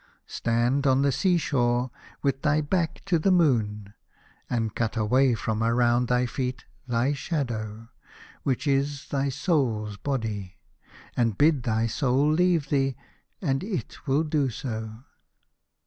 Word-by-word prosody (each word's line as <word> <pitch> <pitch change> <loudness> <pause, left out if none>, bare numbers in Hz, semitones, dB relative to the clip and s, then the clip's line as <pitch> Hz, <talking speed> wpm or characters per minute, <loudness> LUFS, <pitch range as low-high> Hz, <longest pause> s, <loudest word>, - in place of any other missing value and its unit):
Stand 120 +4 0
on 135 +1 +4
the 140 - +3
sea 180 +6 +2
shore 125 -5 +1 0.3
with 135 -1 0
thy 150 -1 +2
back 160 +2 -1
to 180 -4 +2
the 175 - +2
moon, 110 - +2 0.6
and 115 -3 -1
cut 115 0 -2
away 125 +4 +3
from 110 0 -2
around 120 +1 +2
thy 125 +1 +2
feet 125 +1 -3 0.2
thy 120 +3 +1
shadow, 115 -7 -3 0.5
which 130 +1 -1
is 140 0 0
thy 140 0 0
soul's 125 - 0
body, 105 -9 -3 0.6
and 115 -4 +1
bid 150 -2 +4
thy 115 -1 0
soul 130 +5 +2
leave 170 -3 +2
thee, 135 -2 +1 0.5
and 135 +3 0
it 195 -6 -5
will 140 +4 +3
do 150 -3 +1
so." 110 -2 -6
130 Hz, 135 wpm, -26 LUFS, 115-145 Hz, 0.6 s, on